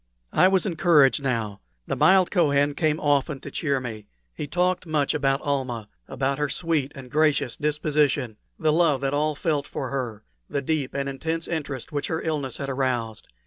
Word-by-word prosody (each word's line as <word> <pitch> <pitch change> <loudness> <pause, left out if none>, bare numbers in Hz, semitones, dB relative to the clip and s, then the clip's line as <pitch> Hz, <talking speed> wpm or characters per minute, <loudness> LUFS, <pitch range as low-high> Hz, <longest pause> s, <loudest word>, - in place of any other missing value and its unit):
I 185 - +6
was 190 +1 +2
encouraged 160 -7 +4
now. 115 -7 -2 0.2
The - - -2
mild 190 -1 +5
Kohen 145 -5 +3
came 155 +1 +1
often 145 -1 +1
to - - -8
cheer 140 -4 0
me. 110 -5 -7 0.3
He 145 - -5
talked 180 +3 0
much 150 -3 +1
about 135 -1 +1
Almah 130 -7 -2 0.2
about 135 +1 -1
her 150 -1 0
sweet 155 -3 -1
and 130 -3 -10
gracious 150 -4 +2
disposition, 145 -5 0 0.2
the 155 -2 +2
love 155 -5 +3
that 135 0 -1
all 150 +1 +1
felt 145 -2 -1
for 130 - -4
her, 120 -6 -4 0.3
the 140 - -2
deep 145 -2 -1
and 140 0 -1
intense 160 +4 -3
interest 145 -5 -4
which 145 -1 -2
her 160 - -1
illness 145 -6 -2
had 140 - -4
aroused. 125 -5 -2
145 Hz, 180 wpm, -25 LUFS, 135-155 Hz, 0.3 s, I